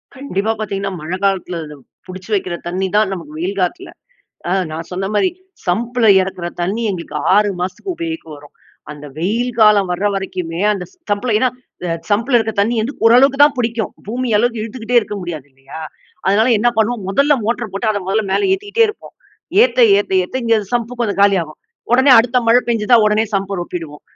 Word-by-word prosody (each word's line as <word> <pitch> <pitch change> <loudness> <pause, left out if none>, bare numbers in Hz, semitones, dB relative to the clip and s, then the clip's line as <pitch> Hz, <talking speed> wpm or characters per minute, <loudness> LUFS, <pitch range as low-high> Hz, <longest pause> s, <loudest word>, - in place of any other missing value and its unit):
கண்டிப்பா 225 -6 -2
பார்த்தீங்கன்னா, 195 -2 -3
மழை 170 +4 -4
காலத்தில 190 -3 0 0.5
புடிச்சு 185 +2 -10
வைக்கிற 185 -3 -1
தண்ணி 185 +2 -1
தான் 210 -2 +3
நமக்கு 165 -5 -8
வெயில் 190 +4 -3
காலத்தில. 350 - -2 0.6
அ - - -1 0.2
நான் 160 +1 -6
சொன்ன 185 +2 -3
மாரி 210 - +3 0.4
சம்ப்பில 230 +6 0
இறக்கிற 185 -2 -4 0.2
தண்ணி 205 +6 -1
எங்களுக்கு 170 -5 -6 0.2
6 205 0 +3
மாசத்துக்கு 185 - -4
உபயோகிக்க 330 -1 -5
வரும். 145 0 -16 0.4
அந்த 150 0 -9
வெயில் 230 +9 -1
காலம் 210 -3 +5
வர 185 +4 -1
வரைக்குமே 180 -4 -4
அந்த 195 -3 -4 0.3
சம்ப்பில 210 +3 0
ஏன்னா 255 - +2 0.6
சம்பில 230 +5 +2
இருக்க 220 -1 -1
தண்ணி 220 +4 +1
வந்து 260 +6 -4
ஓரளவுக்கு 255 +4 +5
தான் 290 -1 +6
புடிக்கும். 230 -2 -1
பூமி 245 +4 -3
அளவுக்கு 235 0 0
இழுத்துக்கிட்டே 230 +2 0
இருக்க 210 - -6
முடியாது 165 -6 -6
இல்லையா? 135 +3 -12 0.5
அதனால 210 +5 +3
என்ன 240 +3 +3
பண்ணுவோம் 220 -1 0
முதல்ல 280 +10 +3
மோட்டார 235 +1 -1
போட்டு 215 +3 0
அதை 205 -1 -1
முதல்ல 215 +2 +1
மேல 395 - +1
ஏத்திக்கிட்டே 410 +4 +1
இருப்போம். 425 - -9 0.5
ஏத்த, 250 0 +2 0.2
ஏத்த, 205 - -3
ஏத்த 180 - -6
இங்க 230 -1 +3 0.2
சம்பு 240 0 -1
கொஞ்சம் 205 -5 -1
காலியாகும். 180 -6 +1 0.3
உடனே 260 +3 +5
அடுத்த 240 +2 +2
மழை 240 +2 +6
பெஞ்சுதா 230 0 +3
உடனே 210 +1 +2
சம்ப்ப 195 0 -2
ரொப்பிடுவோம். 165 -4 -7
210 Hz, 170 wpm, -17 LUFS, 185-240 Hz, 0.6 s, தான்